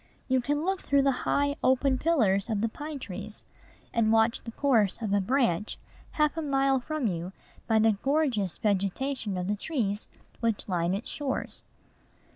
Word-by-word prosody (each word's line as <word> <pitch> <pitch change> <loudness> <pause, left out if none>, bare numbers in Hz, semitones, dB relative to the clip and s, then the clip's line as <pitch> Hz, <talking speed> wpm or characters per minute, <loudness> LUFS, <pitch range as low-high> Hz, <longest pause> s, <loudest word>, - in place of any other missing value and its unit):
You 260 -1 +2
can 290 +5 -1
look 385 0 0
through 280 -1 +2
the 275 - +4 0.2
high, 285 +1 +1
open 260 0 +3
pillars 215 - +2
of 210 -3 0
the 230 - +2
pine 295 +5 -6
trees, 210 -3 -8 0.5
and 225 -2 +2
watch 225 +1 +3
the 230 - -8
course 230 -7 +2
of 215 -4 -2
a 200 - +3
branch 220 -4 +1 0.4
half 300 -1 +2
a 325 - -2
mile 275 -2 +2
from 310 +1 -3
you 180 -2 -2 0.3
by 225 - +3
the 220 0 +5
gorgeous 270 - +1
vegetation 205 +2 -1
of 180 0 -2
the 205 - +1
trees 210 -5 -2 0.3
which 230 -3 -1
line 175 -1 0
its 205 - -5
shores. 280 -3 -3
230 Hz, 170 wpm, -28 LUFS, 205-280 Hz, 0.5 s, the